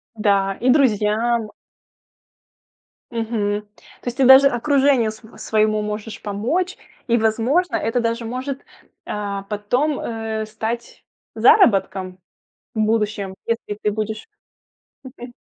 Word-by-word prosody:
Да, 200 -2 +1
и 250 - +2
друзьям. 225 -3 +2 1.6
Мгм. 220 -3 -1 0.4
То - - -22
есть 245 +1 -3
ты 270 - +3
даже 265 +2 +9
окружению 270 -2 +2
свое 220 +1 -15
своему 215 -1 +1
можешь 210 +1 -5
помочь, 250 - -2 0.3
и 235 -1 +3
возможно 235 +11 +1
это 225 +3 0
даже 230 0 -2
может, 260 +4 -5 0.4
э, 200 -1 -3
потом, 245 +8 0
э, 225 -1 -4
стать 220 +2 -5 0.3
заработком 190 - +3 0.5
в 220 - -4
будущем 210 -3 0
если 230 -3 -3
ты 210 - +2
будешь 215 +1 -4 0.8
Мгм. 250 -2 -10
225 Hz, 115 wpm, -21 LUFS, 210-245 Hz, 1.6 s, даже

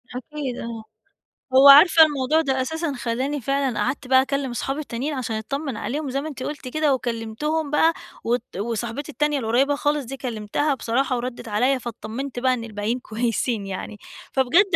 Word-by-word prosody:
أكيد 265 0 -5
آه، 230 -1 -6 0.7
هو 270 +2 +8
عارفة 320 +3 +9
الموضوع 295 +1 +1
ده 265 -4 0
أساسًا 320 +3 -2
خلّاني 260 +4 -2
فعلًا 275 -2 0
قعَدت 260 +5 -2
بقى 260 0 +6
أكلّم 275 0 -2
أصحابي 270 +4 -3
التانيين 280 +1 -3
عشان 245 -5 -3
أتطمّن 275 +3 -4
عليهم 285 +5 -3
زي 275 +2 -1
ما 305 - -5
أنتِ 260 -3 -7
قُلتِ 290 -3 -5
كده 300 +1 +1
وكلّمتهم 255 +6 -2
بقى، 325 +2 +4 0.3
وت 240 -3 -2
وصاحبتي 235 +6 -3
التانية 295 0 0
القريّبة 260 +5 +2
خالص 290 -1 0
دي 270 +3 -7
كلّمتها 245 +4 -1
بصراحة 255 +2 0
وردّت 240 -1 -5
عليَّ 255 +6 +2
فاتطمّنت 240 +3 -6
بقى 255 +1 +2
إن 235 -2 -3
الباقيين 220 +2 -3
كويسين 230 -1 -2
يعني، 195 +2 -6 0.4
فبجد 345 +10 +4
260 Hz, 165 wpm, -23 LUFS, 235-290 Hz, 0.7 s, عارفة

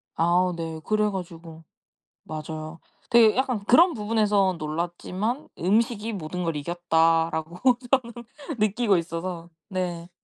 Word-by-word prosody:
아우 175 +2 +2
네. 165 -1 -5
그래 215 0 +2
가지고 165 -4 -8 0.6
맞아요. 155 +1 -7 0.3
되게 230 -2 +6
약간 250 -5 0
'그런 335 - +6
부분에선 210 -4 +1
놀랐지만 175 - -3
음식이 220 +4 +1
모든 180 -1 -4
걸 165 -2 -1
이겼다.'라고 165 0 +1 0.3
저는 250 -3 +2 0.5
느끼고 210 -1 +2
있어서 170 0 -4 0.2
네. 175 -2 -4
180 Hz, 265 characters per minute, -25 LUFS, 165-215 Hz, 0.6 s, 되게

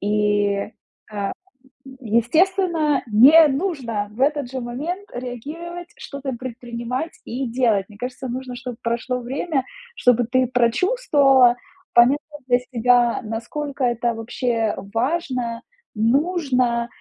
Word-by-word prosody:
И, 205 -1 +1 0.4
а, 200 -2 -3 0.7
естественно, 305 - +2
не 290 +9 +8
нужно 265 - -2
в 220 - -15
этот 285 -2 +1
же 265 - -3
момент 310 +12 -5
реагировать, 310 +9 -7
что-то 280 -2 -6
предпринимать 240 +3 -5
и 255 +2 -4
делать. 230 -5 +1
Мне 205 -2 -15
кажется, 250 +2 -5
нужно, 255 0 -5
чтоб 245 0 -6
прошло 235 +2 -2
время, 270 +3 -2 0.3
чтобы 245 -1 +3
ты 255 -1 +2
прочувствовала, 265 - +3 0.4
поняла 240 +4 +6 0.3
для 245 0 +4
себя, 240 0 +3
насколько 260 +6 -5
это 240 0 0
вообще 225 0 -1 0.2
важно, 250 -3 -1 0.3
нужно, 250 -1 +1
250 Hz, 110 wpm, -22 LUFS, 235-285 Hz, 0.7 s, не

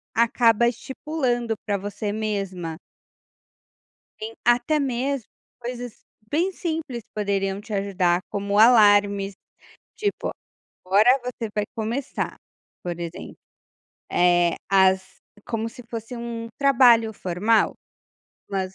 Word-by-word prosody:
acaba 235 0 +4
estipulando 245 -1 -2
pra 205 -2 0
você 205 +1 -4
mesma. 195 -6 -3 1.4
Em 220 +1 -6
até 245 +6 +3
mesmo 270 -1 -1 0.3
coisas 245 -1 -6 0.3
bem 345 +6 +1
simples 315 - -4
que - - -42
poderiam 200 -1 -1
te 220 0 -12
ajudar, 185 -3 +1
como 200 0 -1
alarmes. 205 -3 +5 0.6
Tipo, 410 -1 -2 0.6
agora 205 +6 +5
você 235 -3 -4
vai 210 -1 0
começar, 235 +5 -3 0.5
por 175 -1 -4
exemplo, 170 +1 -7 0.8
eh, 175 -1 +3
as 190 -1 +3 0.2
como 225 -1 -2
se 245 +1 -12
fosse 230 +1 -6
um 235 -1 -5
trabalho 240 -5 +5
formal, 200 +5 +1 0.8
umas 190 -1 -3
220 Hz, 105 wpm, -24 LUFS, 195-245 Hz, 1.4 s, alarmes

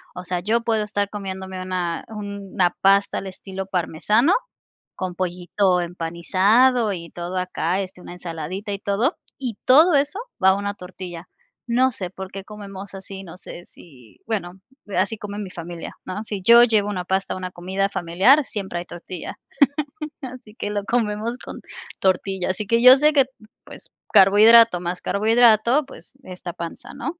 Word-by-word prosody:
O 180 - -6
sea, 180 0 -2
yo 220 +6 +1
puedo 225 -2 0
estar 205 -1 -2
comiéndome 190 -2 -6
una 180 -2 -3
una 200 -3 -2
pasta 195 +1 +3
al 195 - -4
estilo 190 0 -7
parmesano 195 - +1 0.6
con 185 -1 -4
pollito 180 +1 0
empanizado 190 +8 +2
y 170 -3 -7
todo 175 +1 -6
acá, 180 0 -1
este, 185 -1 -7
una 175 - -10
ensaladita 180 +4 -6
y 200 - -4
todo. 205 - 0 0.2
Y 245 -6 -4
todo 310 +7 +6
eso 290 +7 +1 0.2
va 190 - +7
a 190 - +3
una 200 0 -3
tortilla. 180 -2 -9 0.4
No 255 +2 +2
sé 185 -5 -5
por 190 +1 -9
qué 195 - -6
comemos 200 -1 -10
así, 195 0 -9
no 180 -2 -11
sé 175 -1 -10
si, 130 -13 -18
bueno, 190 -4 -4 0.4
así 225 - +1
come 205 0 -7
mi 200 -3 -5
familia, 170 -1 -7
¿no? 205 +4 -5
Si 205 -3 -5
yo 235 +4 +8
llevo 215 -3 +2
una 185 -3 -3
pasta, 190 +1 -1
a - - -7
una 185 -1 -6
comida 190 +3 -2
familiar, 200 - +3
siempre 195 -7 -5
hay - - -7
tortilla. 175 0 -8 0.9
Así 250 -4 -9
que 205 - -4
lo 205 -1 -2
comemos 225 +1 -1
con - - -9 0.4
tortilla. 190 0 0
Así 190 +3 -2
que 230 +3 +2
yo 255 +2 +9
sé 300 +2 +3
que, 275 -3 +5 0.4
pues, - - -13 0.2
carbohidrato 215 +1 +7
más 180 +1 -3
carbohidrato, 230 +5 +3
pues, 270 0 -15
esta 180 -3 -8
panza, 170 -1 -8
¿no? 335 +3 -5
195 Hz, 170 wpm, -22 LUFS, 180-220 Hz, 0.9 s, yo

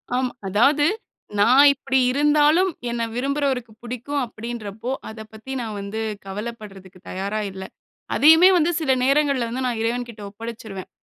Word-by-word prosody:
ஆம் 255 0 0 0.2
அதாவது, 275 +10 +3 0.5
"நா 205 - +5 0.3
இப்படி 265 -1 0
இருந்தாலும் 295 +6 +3 0.2
என்ன 235 -1 -2
விரும்புறவருக்கு 265 -2 -1
புடிக்கும்." 250 +4 -3
அப்படீன்றப்போ, 230 0 -6 0.2
அத 220 0 -10
பத்தி 225 +5 -8
நா - - -4
வந்து 200 +3 -5 0.2
கவலப்படுறதுக்கு 195 -2 -8
தயாரா 200 +3 -3
இல்ல. 190 0 -8 0.5
அதையுமே 320 +5 +7
வந்து 340 +1 +2
சில 285 -4 +1
நேரங்கள்ல 275 -3 +2
வந்து 255 +2 -3
நா - - 0
இறைவன்கிட்ட 235 -1 -3
ஒப்படைச்சுருவேன். 215 -2 -8
240 Hz, 130 wpm, -22 LUFS, 215-280 Hz, 0.5 s, அதையுமே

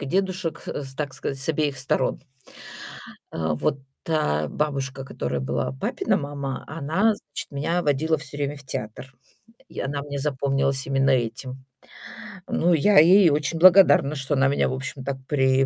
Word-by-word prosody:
и 140 - -5
дедушек, 185 0 -2
э, 145 - -4
так 145 -3 -3
сказать, 135 0 -4
с 160 - -3
обеих 150 -3 0
сторон. 130 -1 -1 1.1
Э, 80 -1 -1
вот 135 - -1 0.2
та 75 - 0
бабушка, 135 - -3
которая 70 - -3
была 65 0 -2
папина 65 - -1
мама, 140 -2 -4
она 165 +9 +1
значит 145 - -8
меня 160 +5 -1
водила 155 +1 +1
всё 145 -1 -8
время 145 0 -2
в 140 - -11
театр. 125 +2 -6 0.6
И - - -7
она 140 +1 -3
мне 140 0 -5
запомнилась 135 -1 0
именно 135 0 +2
этим. 130 +1 -2 0.8
Ну 175 +1 +2
я 195 +6 +5
ей 175 +2 +7
очень 150 +2 -1
благодарна, 180 -4 +6
что 140 +1 -1
она 135 +1 +3
меня, 140 - +1
в - - -2
общем-то, 135 0 -5
при 135 -2 +3
140 Hz, 155 wpm, -24 LUFS, 135-155 Hz, 1.1 s, ей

